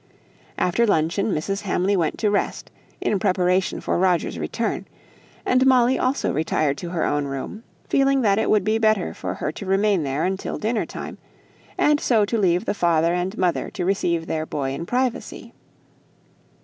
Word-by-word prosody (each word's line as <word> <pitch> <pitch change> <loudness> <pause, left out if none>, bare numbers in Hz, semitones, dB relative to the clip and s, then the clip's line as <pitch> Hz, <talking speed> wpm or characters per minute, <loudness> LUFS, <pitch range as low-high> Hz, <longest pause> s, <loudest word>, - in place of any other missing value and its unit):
After 230 +7 +2
luncheon, 185 +3 +1
Mrs. 195 +5 -2
Hamley 195 0 0
went 165 -4 0
to 210 -2 +1
rest, 205 - -2 0.3
in 205 - 0
preparation 185 -2 +1
for - - -1
Roger's 180 -2 +1
return; - - -3 0.6
and 255 +1 +3
Molly 255 -1 +4
also 260 +2 0
retired 150 -1 0
to 175 - -5
her 170 -2 -1
own 145 -1 0
room, 135 +10 -5 0.3
feeling 275 0 +3
that 205 -3 +3
it - - 0
would 210 -3 +3
be 215 +2 +1
better 215 - +2
for 95 +1 -5
her 150 - -3
to 200 - -8
remain 195 -1 +2
there 140 +1 -1
until 190 +1 -3
dinner 220 +1 -1
time, - - -7 0.6
and 295 0 +3
so 225 -7 +3
to 230 +3 -1
leave 180 0 +2
the - - 0
father 170 -3 +2
and 180 +4 -2
mother 180 -2 0
to 180 - -4
receive 170 -3 0
their 155 -1 -3
boy 135 -2 -2
in 155 +5 -5
privacy. 250 +1 -2
190 Hz, 175 wpm, -23 LUFS, 165-215 Hz, 0.6 s, Molly